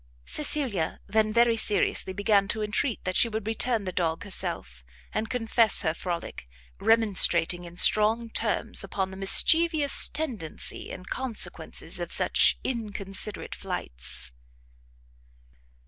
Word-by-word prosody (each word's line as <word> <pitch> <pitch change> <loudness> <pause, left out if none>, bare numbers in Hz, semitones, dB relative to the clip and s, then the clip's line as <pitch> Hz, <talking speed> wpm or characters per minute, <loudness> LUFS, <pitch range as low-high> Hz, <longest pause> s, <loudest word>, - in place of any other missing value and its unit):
Cecilia 270 - -1
then, 215 +1 -1
very 235 +1 +2
seriously 210 -3 0
began 200 +1 0
to 215 +1 -3
entreat 210 +3 -2
that 185 0 -4
she 235 - +3
would 220 -1 -6
return 225 0 -2
the 185 - -5
dog 165 -3 -3
herself, 65 - -4 0.3
and 225 - -4
confess 230 -2 0
her 160 -3 -1
frolic, 170 - -7 0.3
remonstrating 185 -6 +3
in 170 0 -13
strong 220 +4 +5
terms - - -1
upon 190 -1 -5
the - - -10
mischievous 310 - +6
tendency 235 - -4
and 185 - -10
consequences 255 -4 -4
of - - -6
such - - +2
inconsiderate 210 -4 -4
flights. - - -4
210 Hz, 120 wpm, -25 LUFS, 185-230 Hz, 0.3 s, mischievous